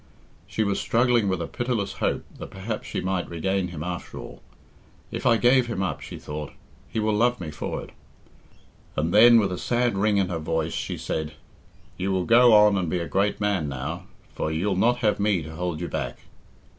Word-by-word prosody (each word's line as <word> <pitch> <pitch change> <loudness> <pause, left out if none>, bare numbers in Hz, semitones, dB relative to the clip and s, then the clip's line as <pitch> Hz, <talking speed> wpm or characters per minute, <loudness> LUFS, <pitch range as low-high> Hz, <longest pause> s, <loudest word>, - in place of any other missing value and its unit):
She 105 +2 -1
was 100 -1 0
struggling 120 -2 +2
with 95 -3 -1
a - - -5
pitiless 120 -5 -2
hope - - 0
that - - -7
perhaps 105 +3 -5
she - - -3
might 95 -1 -2
regain 95 +3 -1
him 85 -3 -6
after 90 0 -5
all. - - -9 0.7
"If - - -2
I 115 -2 +5
give 125 +1 +4
him 105 -5 -2
up," 75 -7 -3
she - - -8
thought, 75 -1 -7 0.4
"he 110 - -2
will 110 0 +1
love 120 +3 +2
me 85 -4 -5
for 75 - -4
it;" - - -13 1.0
and 80 +3 -1
then, 115 +2 +8
with 100 -3 +1
a 90 - -4
sad 120 -2 +1
ring 100 +1 +2
in 95 -2 +1
her 85 -2 -2
voice, 80 0 -2
she - - -3
said, 80 -1 -3 0.6
"You 95 +2 -1
will 95 -2 0
go 120 +1 +6
on 105 -2 +6
and 90 -3 -2
be 90 - 0
a 85 -1 -3
great 100 +2 0
man 100 -8 0
now, 70 +6 -5 0.3
for 80 - -2
you'll 95 +5 0
not 120 +6 +3
have 105 - +2
me 100 -5 +1
to 80 +1 -9
hold 90 -2 -3
you 85 - -3
back." - - -4
95 Hz, 205 wpm, -25 LUFS, 85-110 Hz, 1.0 s, then